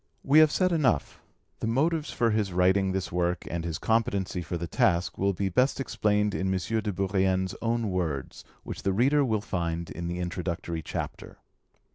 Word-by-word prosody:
We 145 +3 +6
have 155 -1 +6
said 185 +2 +2
enough, 135 - +1 0.4
the - - -2
motives 150 +6 +1
for 115 -1 +1
his 105 -3 0
writing 95 +2 +3
this 95 0 -3
work 90 0 0
and 85 -1 -2
his 85 -2 -3
competency 100 -5 0
for 85 +1 -4
the 85 - -4
task 85 +1 +1
will 100 +1 +2
be 95 +2 -1
best 125 +11 +2
explained 105 -5 +1
in 95 0 -1
M. 95 - +1 0.2
de 105 -1 -2
Bourrienne's 95 -1 0
own 115 -2 0
words, 80 -7 -3 0.2
which - - -6
the 95 - 0
reader 140 +8 +3
will 110 -5 0
find 85 -5 -3
in 85 0 -5
the 85 +1 -3
Introductory 85 -2 -3
Chapter. - - -6
95 Hz, 180 wpm, -27 LUFS, 90-115 Hz, 0.4 s, We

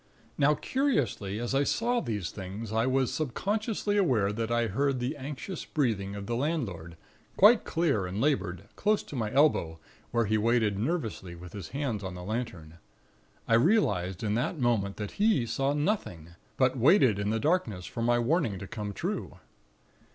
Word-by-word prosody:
"Now, 145 +2 +3
curiously, 145 - -1
as 120 +2 -2
I 135 +1 +3
saw 240 - +1
these 105 -7 -3
things, 100 +3 -7
I 115 +2 +2
was 130 -1 +1
subconsciously 205 - -1
aware 120 - +2
that 115 +1 -2
I 120 0 +2
heard 135 +5 0
the 125 +4 -2
anxious 145 +6 -6
breathing 105 -9 -1
of 100 -1 -6
the 120 - -2
landlord, 110 - -3 0.4
quite 215 +4 +6
clear 145 - +1
and 95 +3 -4
labored, 100 - 0
close 210 0 +1
to - - -9
my 110 -4 -2
elbow, 130 - +3 0.3
where 120 -1 +1
he 110 +1 +1
waited 110 -3 +2
nervously 110 - -3
with 85 +1 -11
his 100 -6 -7
hands 130 -7 -3
on 95 -1 -5
the 90 - -7
lantern. 90 -7 -5 0.7
I - - +2
realized 110 - +2
in 105 -1 0
that 120 +8 -1
moment 115 -7 0
that 105 - -6
he 210 - +3
saw 135 +5 0
nothing; 145 - -2 0.3
but 130 0 +3
waited 130 - +4
in 100 0 -1
the 110 +1 0
darkness, 115 - 0
for 115 - -5
my 120 +1 +3
warning 120 - +1
to 95 - -7
come 105 0 -5
true. - - -4
115 Hz, 175 wpm, -29 LUFS, 100-145 Hz, 0.7 s, quite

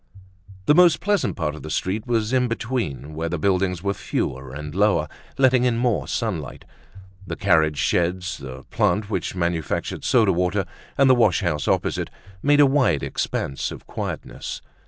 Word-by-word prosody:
The - - +5
most 170 -1 +6
pleasant 205 0 0
part 80 -4 -2
of 80 - -9
the 80 - -7
street 95 +8 -2
was 115 -1 0
in 125 -1 +3
between, 115 - -3
where 80 +2 -3
the 90 - -2
buildings 90 0 0
were 100 0 0
fewer 65 -7 -3
and 75 +2 -7
lower, 105 +3 +2 0.3
letting 130 -2 +4
in 120 -2 +2
more 120 -2 0
sunlight. 95 - -3 0.6
The - - -3
carriage 80 -6 +2
sheds, 90 +5 0
the 65 -1 -8
plant 105 0 +1
which - - -2
manufactured 85 -3 -2
soda 110 -7 +4
water, 90 +2 0 0.3
and 140 - +5
the 130 - +7
wash 120 -2 +3
house 75 -6 -1
opposite - - 0 0.3
made 145 +4 +4
a 145 - +8
wide 130 - +2
expanse 70 - -2
of - - -9
quietness. - - -6
95 Hz, 165 wpm, -23 LUFS, 80-120 Hz, 0.6 s, a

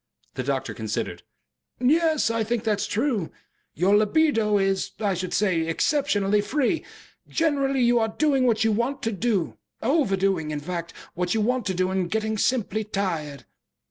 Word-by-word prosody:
The - - -3
doctor - - -2
considered. - - -4 0.6
"Yes, 310 0 +3
I 230 -1 0
think 230 +1 -2
that 215 -3 0
is - - -1
true. 220 - -1 0.5
Your 190 +5 +3
LIBIDO 215 -1 +3
is, 195 -1 0
I 205 -3 +1
should 185 0 -4
say, 175 -6 +1
exceptionally 205 - +1
free. 270 +8 0 0.4
Generally 275 -5 +1
you 240 0 +4
are 225 - +2
doing 270 +1 +2
what 220 -2 +2
you 225 - +3
want 240 +6 -1
to 225 - 0
do 205 -3 -1 0.2
overdoing, 195 - +1
in 150 -1 -3
fact, 170 +2 -5 0.2
what 180 +3 -1
you 220 - +1
want 245 0 0
to 190 - -1
do 185 +1 0
and 185 -2 -1
getting 220 +1 -1
simply 220 -3 0
tired." 170 -9 -3
215 Hz, 165 wpm, -25 LUFS, 190-255 Hz, 0.6 s, you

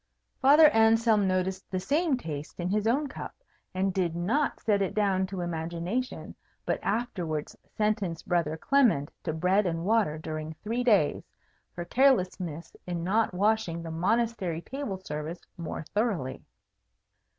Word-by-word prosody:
Father 295 +4 +8
Anselm 225 -3 +4
noticed 185 0 -1
the 185 - -2
same 290 - +1
taste 155 - -7
in 175 +1 -1
his 210 +2 +1
own 275 +6 +2
cup, 275 - -7 0.4
and 190 +1 0
did 175 -3 0
not 225 +13 0
set 205 -2 +1
it 195 - -1
down 195 -3 +2
to 190 -1 -5
imagination, 175 +8 -3 0.3
but - - 0
afterwards 185 -8 -2 0.2
sentenced 210 -6 -1
Brother 165 -3 0
Clement 220 - +2
to 160 - -1
bread 180 +5 +2
and 165 0 -2
water 210 -7 +2
during 155 0 -5
three 230 +3 -1
days, 205 -11 +3 0.5
for 175 - -5
carelessness 185 - +1
in 175 -1 -3
not 215 +5 +2
washing 190 -3 0
the 165 - -6
Monastery 190 -1 0
table 270 -8 -4
service 160 -2 -6
more 165 -1 -5
thoroughly. 205 - -1
190 Hz, 140 wpm, -28 LUFS, 170-225 Hz, 0.5 s, Father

